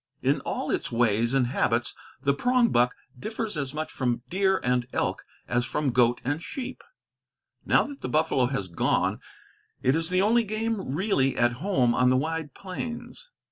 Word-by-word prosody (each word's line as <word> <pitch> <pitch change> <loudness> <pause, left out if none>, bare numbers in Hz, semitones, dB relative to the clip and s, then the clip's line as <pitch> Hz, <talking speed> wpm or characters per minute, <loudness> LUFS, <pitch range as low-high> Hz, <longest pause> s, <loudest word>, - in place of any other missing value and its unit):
In - - +2
all - - -3
its - - -1
ways 115 +1 +2
and 135 -2 +3
habits 120 -1 0 0.3
the 140 - +2
prongbuck 230 - +3 0.3
differs 220 - -4
as 140 -3 -2
much 155 +2 -4
from 120 -2 -1
deer 190 +1 +2
and 125 -1 +1
elk - - -1 0.3
as 120 0 +1
from 135 +2 -1
goat 120 0 +3
and 145 +5 -1
sheep. 260 +7 -6 0.8
Now - - +5
that 280 -1 -8
the - - -3
buffalo 155 -5 +2
has 110 -7 -2
gone, 85 -2 0 0.6
it 130 +3 +3
is 165 +1 -1
the 185 +1 +2
only 230 +3 +4
game 215 -7 -2
really 150 - +1
at 120 0 +3
home 135 -11 +2
on 125 +1 +3
the 130 - +4
wide 160 0 -3
plains. 235 - -7
145 Hz, 170 wpm, -27 LUFS, 125-200 Hz, 0.8 s, Now